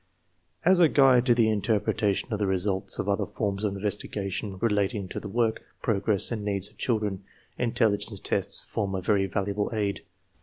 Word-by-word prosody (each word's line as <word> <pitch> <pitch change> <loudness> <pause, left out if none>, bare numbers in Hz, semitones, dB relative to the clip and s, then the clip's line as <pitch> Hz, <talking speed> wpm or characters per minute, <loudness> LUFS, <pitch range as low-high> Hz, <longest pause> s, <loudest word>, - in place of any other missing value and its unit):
As 185 +1 +5
a 165 -3 +6
guide 130 -3 +5
to 120 - +5
the 115 -2 +3
interpretation 105 +1 0
of 105 - -2
the 100 - 0
results 95 0 -1
of - - -3
other 100 -1 0
forms 100 -1 -3
of 100 -2 -1
investigation 100 -1 -3
relating 105 -1 0
to - - -4
the 100 - -8
work, 115 +1 0 0.2
progress, 105 -1 +1
and 110 -3 -3
needs 100 -1 -1
of - - -27
children, 105 -5 -1 0.4
intelligence 110 -4 0
tests - - +2
form 100 -3 -3
a 95 - -2
very 100 0 +2
valuable 100 +2 -2
aid. 100 -2 -1
105 Hz, 175 wpm, -27 LUFS, 100-110 Hz, 0.4 s, a